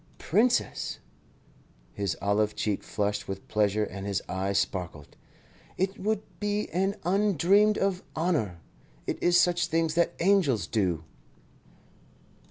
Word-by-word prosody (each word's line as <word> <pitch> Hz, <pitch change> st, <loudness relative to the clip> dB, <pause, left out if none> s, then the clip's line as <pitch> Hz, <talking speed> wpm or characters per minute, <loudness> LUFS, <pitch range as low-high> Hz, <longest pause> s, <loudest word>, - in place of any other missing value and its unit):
"Princess!" 235 Hz, +7 st, +1 dB, 1.0 s
His 100 Hz, -3 st, -2 dB
olive 105 Hz, +1 st, +1 dB
cheek 105 Hz, -2 st, -1 dB
flushed 105 Hz, 0 st, -2 dB
with 95 Hz, 0 st, -6 dB
pleasure 105 Hz, 0 st, +1 dB
and 100 Hz, -1 st, -5 dB
his 100 Hz, -2 st, 0 dB
eyes 95 Hz, +1 st, -1 dB
sparkled. 90 Hz, -7 st, -3 dB, 0.6 s
"It 190 Hz, +4 st, -1 dB
would 215 Hz, +1 st, -1 dB, 0.2 s
be 210 Hz, 0 st, -1 dB
an 195 Hz, +3 st, 0 dB
undreamed 200 Hz, +2 st, +3 dB
of 195 Hz, -2 st, 0 dB
honour. 150 Hz, -, 0 dB, 0.4 s
It -, -, -3 dB
is 175 Hz, 0 st, +5 dB
such 175 Hz, 0 st, +2 dB
things 165 Hz, -1 st, +1 dB
that 170 Hz, +1 st, +1 dB
angels 175 Hz, -, +3 dB
do." 90 Hz, -7 st, 0 dB
160 Hz, 120 wpm, -28 LUFS, -, 1.0 s, is